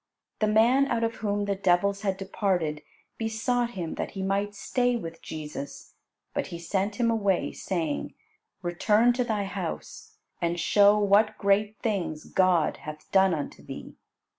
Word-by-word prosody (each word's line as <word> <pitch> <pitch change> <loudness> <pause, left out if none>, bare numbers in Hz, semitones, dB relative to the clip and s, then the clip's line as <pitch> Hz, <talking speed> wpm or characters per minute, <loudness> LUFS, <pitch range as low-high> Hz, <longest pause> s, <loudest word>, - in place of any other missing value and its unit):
The 215 - +2
man 235 +6 +4
out 230 -3 0
of 230 0 -1
whom 205 -1 -1
the 200 - 0
devils 195 +1 +2
had 195 -3 -1
departed, 185 -6 -1 0.4
besought 235 +2 -1
Him 170 -3 -3
that - - -5
he 190 - -2
might 200 +2 -1
stay 245 +4 +1
with 165 -7 -6
Jesus, 150 -2 -7 0.4
but - - -2
He 170 - -6
sent 190 +4 -1
him 230 +1 +2
away, 200 -5 +1
saying, 165 -6 -3 0.5
"Return 210 +7 +3
to 250 +1 0
thy 215 -4 -1
house, 435 - -6 0.2
and 170 0 0
show 205 +4 +5
what 210 +1 +3
great 205 +2 +2
things 185 -8 -1
God 185 -4 +2
hath 155 0 -9
done 190 -2 +5
unto 145 - -6
thee." - - -9
200 Hz, 155 wpm, -27 LUFS, 175-220 Hz, 0.5 s, show